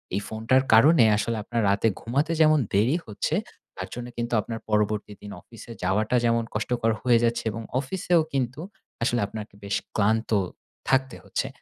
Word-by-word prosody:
এই 100 - 0
ফোনটার 115 +4 +1
কারণে 140 +4 +7
আসলে 115 +1 -1
আপনার 115 +1 -2
রাতে 100 +3 +2
ঘুমাতে 140 +8 -1
যেমন 155 -1 +5
দেরি 115 +10 +3
হচ্ছে, 105 -2 -2 0.4
তার - - -5
জন্য 120 0 -6
কিন্তু 120 0 -3
আপনার 115 +2 -6
পরবর্তী 105 0 0
দিন 105 0 -9
অফিসে 115 0 -13
যাওয়াটা 105 +6 +1
যেমন 115 0 +2
কষ্টকর 115 +1 0
হয়ে 120 -2 +4
যাচ্ছে 115 0 +1
এবং 115 +2 -6 0.2
অফিসেও 170 +4 +1
কিন্তু 130 +2 -2 0.4
আসলে 120 -1 +1
আপনাকে 105 0 -8
বেশ 100 0 -2 0.2
ক্লান্ত 110 +2 +1 0.6
থাকতে 130 -1 +1
হচ্ছে। - - -3
115 Hz, 160 wpm, -25 LUFS, 110-130 Hz, 0.6 s, কারণে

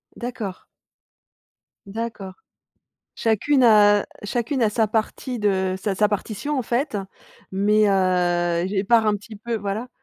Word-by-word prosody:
D'accord. 235 -6 -6 1.2
D'accord. 200 -2 -6 0.8
Chacune 250 +5 +2
a 205 -3 +6 0.2
chacune 240 +5 -2
a 220 - +4
sa 220 +1 +1
partie 225 +3 -2
de 190 -2 +1
sa 205 - -1
sa 210 +1 +3
partition, 220 +7 -3
en - - +1
fait 240 0 -1 0.5
mais 210 +2 +3
heu, 175 -2 +1
j 205 - -4
et 190 - +1
part 230 +1 +4
un 210 - +3
petit 215 +2 -10
peu 230 +3 -4
voilà. 205 +4 -4
210 Hz, 140 wpm, -23 LUFS, 195-235 Hz, 1.2 s, a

